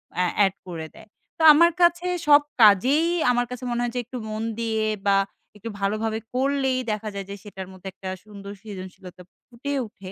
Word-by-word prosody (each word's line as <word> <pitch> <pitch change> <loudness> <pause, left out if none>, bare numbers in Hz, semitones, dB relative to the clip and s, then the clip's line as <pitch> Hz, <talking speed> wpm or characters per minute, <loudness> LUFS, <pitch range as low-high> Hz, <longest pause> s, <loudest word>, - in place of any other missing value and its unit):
অ্যা 180 - +1 0.2
add 195 - 0
করে 160 -3 -6
দেয়। 220 - -15 0.3
তো - - -6
আমার 340 +3 +5
কাছে 345 +1 +3 0.2
সব 290 0 +8 0.2
কাজেই 250 - +6 0.3
আমার 245 0 +1
কাছে 250 0 -7
মনে 240 0 -1
হয় 240 0 -2
যে - - 0
একটু 250 +1 -7
মন 215 +1 -3 0.2
দিয়ে 220 -1 0 0.2
বা 195 0 +5 0.4
একটু 225 +3 -7
ভালোভাবে 215 +2 -1
করলেই 265 0 +1
দেখা 215 0 -3
যায় 195 - -4
যে 200 - -5
সেটার 190 -3 -8
মধ্যে 190 +1 -11
একটা 190 - -7
সুন্দর 200 -1 -10
সৃজনশীলতা 190 -3 -10 0.3
ফুটে 265 +4 -5
উঠে 190 -2 -11
220 Hz, 185 wpm, -24 LUFS, 195-255 Hz, 0.4 s, সব